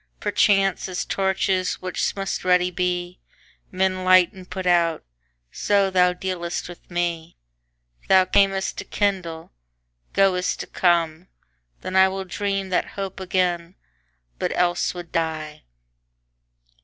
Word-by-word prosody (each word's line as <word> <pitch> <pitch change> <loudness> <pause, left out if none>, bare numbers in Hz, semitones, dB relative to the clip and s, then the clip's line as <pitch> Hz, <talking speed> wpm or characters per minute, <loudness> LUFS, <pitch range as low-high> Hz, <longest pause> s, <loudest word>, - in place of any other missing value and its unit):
Perchance, 195 -2 +2
as 180 - -3
torches, 190 -1 0
which 185 0 -2
must 195 -1 -3
ready 180 0 +3
be, 180 0 -2 0.5
Men 185 0 0
light 185 -1 +5
and 185 -1 -13
put 190 -1 -5
out, 170 -2 +2 0.5
so 200 -1 +1
thou 180 -1 +4
dealst 180 -1 -4
with 175 -1 -13
me. 170 -2 -3 0.7
Thou 190 -1 +6
cam'st 195 0 +1
to - - -4
kindle, 180 -6 -2 0.6
goest 185 -2 +2
to - - -6
come: 170 -1 +1 0.5
then - - -6
IWill 190 0 +3
dream 195 +1 -2
that 180 - 0
hope 195 -1 -4
again, 180 -1 -1 0.6
but - - -1
else 175 0 +1
would 175 -2 -8
die. 155 -2 -3
185 Hz, 120 wpm, -23 LUFS, 175-190 Hz, 0.7 s, Thou